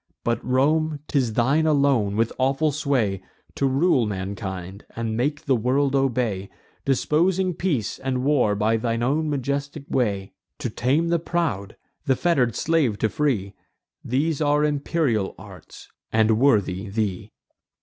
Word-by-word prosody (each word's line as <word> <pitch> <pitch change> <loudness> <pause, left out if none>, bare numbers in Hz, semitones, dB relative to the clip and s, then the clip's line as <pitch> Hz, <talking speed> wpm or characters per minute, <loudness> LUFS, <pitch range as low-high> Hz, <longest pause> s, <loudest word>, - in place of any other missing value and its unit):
But, 120 0 -1
Rome, 150 +4 +1
'tis 130 -6 0
thine 140 +8 +2
alone, 140 -9 +2
with 115 +1 +1
awful 135 +4 +2
sway, 130 -10 0 0.3
To 140 - 0
rule 135 -3 +2
mankind, 95 -1 -5
and 115 -1 -2
make 145 +6 -1
the 135 - +3
world 135 +4 +1
obey, 120 -8 0 0.4
Disposing 175 +7 +1
peace 145 - -2
and 130 -1 -2
war 130 -7 +2
by 110 +2 +1
thy 115 0 -1
own 145 +7 0
majestic 140 +1 -3
way; 100 -6 -1 0.2
To 130 -6 -4
tame 140 +10 +1
the 170 0 +2
proud, 155 - -2 0.3
the 135 - +4
fetter'd 130 -8 +1
slave 150 -10 +1
to 110 - +1
free: 105 -9 -1 0.5
These 145 +5 0
are 150 0 +3
imperial 145 - 0
arts, - - -13 0.2
and 110 0 +3
worthy 105 -7 +2
thee." 100 -3 -3
130 Hz, 140 wpm, -23 LUFS, 110-150 Hz, 0.5 s, the